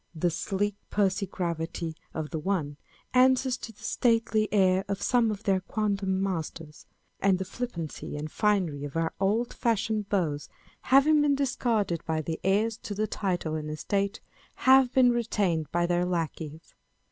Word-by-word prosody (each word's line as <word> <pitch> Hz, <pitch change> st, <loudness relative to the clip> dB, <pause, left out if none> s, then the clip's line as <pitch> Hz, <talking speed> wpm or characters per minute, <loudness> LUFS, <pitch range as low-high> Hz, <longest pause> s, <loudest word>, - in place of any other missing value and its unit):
The 170 Hz, +2 st, +1 dB
sleek 200 Hz, +5 st, -1 dB, 0.2 s
pursy 195 Hz, -1 st, +1 dB
gravity 170 Hz, -2 st, -3 dB, 0.2 s
of 155 Hz, -1 st, -5 dB
the 160 Hz, -, -2 dB
one 155 Hz, -5 st, -2 dB, 0.4 s
answers 260 Hz, 0 st, +4 dB
to 235 Hz, -, -8 dB
the 215 Hz, -, -19 dB
stately 225 Hz, -3 st, +1 dB
air 190 Hz, -2 st, +3 dB
of 200 Hz, -1 st, -2 dB
some 240 Hz, 0 st, +2 dB
of 210 Hz, 0 st, -4 dB
their 190 Hz, -2 st, +2 dB
quondam 195 Hz, -2 st, -1 dB
masters; 165 Hz, -4 st, -5 dB, 0.3 s
and 195 Hz, -1 st, +3 dB
the 190 Hz, -, -3 dB
flippancy 185 Hz, -9 st, -5 dB
and 150 Hz, +1 st, -5 dB
finery 185 Hz, -9 st, +1 dB
of 145 Hz, 0 st, -6 dB
our 165 Hz, 0 st, 0 dB
old 215 Hz, +5 st, +1 dB
fashioned 220 Hz, -2 st, 0 dB
beaux, 165 Hz, -8 st, 0 dB, 0.5 s
having 290 Hz, +3 st, +6 dB
been 290 Hz, -1 st, +3 dB
discarded 230 Hz, -, 0 dB
by 160 Hz, -1 st, -1 dB
the 160 Hz, +1 st, -4 dB
heirs 210 Hz, +4 st, +2 dB
to 205 Hz, -, -6 dB
the 215 Hz, +2 st, 0 dB
title 180 Hz, -7 st, -2 dB
and 155 Hz, -1 st, -3 dB
estate, 195 Hz, +6 st, -2 dB, 0.3 s
have 260 Hz, -1 st, +5 dB
been 255 Hz, -2 st, +5 dB
retained 200 Hz, -10 st, 0 dB
by 175 Hz, 0 st, +1 dB
their 175 Hz, 0 st, +1 dB
lacqueys. 160 Hz, -2 st, -4 dB
195 Hz, 160 wpm, -28 LUFS, 165-220 Hz, 0.5 s, having